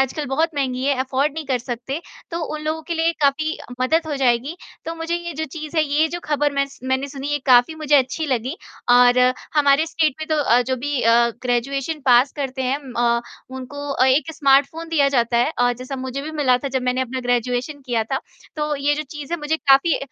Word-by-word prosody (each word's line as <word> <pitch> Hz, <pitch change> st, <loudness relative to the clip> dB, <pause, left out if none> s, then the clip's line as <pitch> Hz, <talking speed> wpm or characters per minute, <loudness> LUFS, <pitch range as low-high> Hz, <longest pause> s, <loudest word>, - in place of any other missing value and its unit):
आजकल 270 Hz, +3 st, -1 dB
बहुत 315 Hz, +6 st, 0 dB
महँगी 260 Hz, -3 st, -2 dB
है 280 Hz, -, +2 dB
अफ़ोर्ड 265 Hz, +3 st, 0 dB
नहीं 320 Hz, -, -5 dB
कर 260 Hz, -2 st, 0 dB
सकते, 245 Hz, +4 st, -5 dB, 0.3 s
तो 335 Hz, -, -3 dB, 0.2 s
उन 305 Hz, -, -5 dB
लोगों 315 Hz, +1 st, -2 dB
के 340 Hz, -, -1 dB
लिए 330 Hz, +1 st, +1 dB
काफ़ी 310 Hz, +3 st, +1 dB, 0.2 s
मदद 315 Hz, +6 st, +2 dB
हो 300 Hz, -, -2 dB
जाएगी। 260 Hz, +3 st, +1 dB, 0.3 s
तो 330 Hz, -, -4 dB
मुझे 330 Hz, +1 st, -3 dB
ये 345 Hz, 0 st, -6 dB
जो 315 Hz, -, -2 dB
चीज़ 310 Hz, +2 st, -8 dB
है, 315 Hz, -, +5 dB
ये 300 Hz, +2 st, +2 dB
जो 350 Hz, +2 st, -5 dB
खबर 295 Hz, -1 st, 0 dB
मैं 280 Hz, 0 st, +1 dB
स 275 Hz, -, -16 dB
मैंने 260 Hz, +2 st, -1 dB
सुनी 275 Hz, 0 st, -6 dB
ये 290 Hz, -, 0 dB
काफ़ी 250 Hz, +4 st, +5 dB
मुझे 305 Hz, -2 st, 0 dB
अच्छी 275 Hz, +4 st, 0 dB
लगी 260 Hz, +4 st, -2 dB, 0.3 s
और 245 Hz, 0 st, +6 dB, 0.4 s
हमारे 290 Hz, +1 st, +4 dB
स्टेट 315 Hz, -3 st, 0 dB
में 310 Hz, -, -4 dB
तो 310 Hz, -, +1 dB
अ, 240 Hz, -1 st, +4 dB
जो 260 Hz, +1 st, -2 dB
भी 285 Hz, +1 st, -2 dB
अ, 235 Hz, +1 st, +4 dB
ग्रेजुएशन 275 Hz, +5 st, -1 dB
पास 250 Hz, +2 st, +5 dB
करते 265 Hz, -2 st, -3 dB
हैं 260 Hz, +2 st, 0 dB
म 255 Hz, -, -9 dB
अ, 235 Hz, 0 st, +2 dB, 0.4 s
उनको 285 Hz, +3 st, -7 dB
अ, 255 Hz, -, +2 dB
1 295 Hz, +5 st, +2 dB
स्मार्टफ़ोन 285 Hz, +4 st, +2 dB
दिया 295 Hz, -4 st, +3 dB
जाता 235 Hz, 0 st, +2 dB
है 240 Hz, +5 st, +2 dB
अ, 245 Hz, 0 st, +3 dB
जैसा 255 Hz, +3 st, -7 dB
मुझे 260 Hz, +1 st, -5 dB
भी 305 Hz, -, -5 dB
मिला 255 Hz, -2 st, +4 dB
था 275 Hz, -, -4 dB
जब 260 Hz, -1 st, -2 dB
मैंने 250 Hz, +1 st, 0 dB
अपना 260 Hz, 0 st, -3 dB
ग्रेजुएशन 245 Hz, +4 st, -1 dB
किया 235 Hz, -3 st, 0 dB
था। 270 Hz, -, +1 dB, 0.4 s
तो 300 Hz, 0 st, -1 dB
ये 285 Hz, +1 st, +1 dB
जो 305 Hz, -, -3 dB
चीज़ 295 Hz, +1 st, -7 dB
है 345 Hz, -, 0 dB
मुझे 295 Hz, +2 st, 0 dB
काफ़ी 280 Hz, +2 st, +4 dB
275 Hz, 225 wpm, -21 LUFS, 255-305 Hz, 0.4 s, और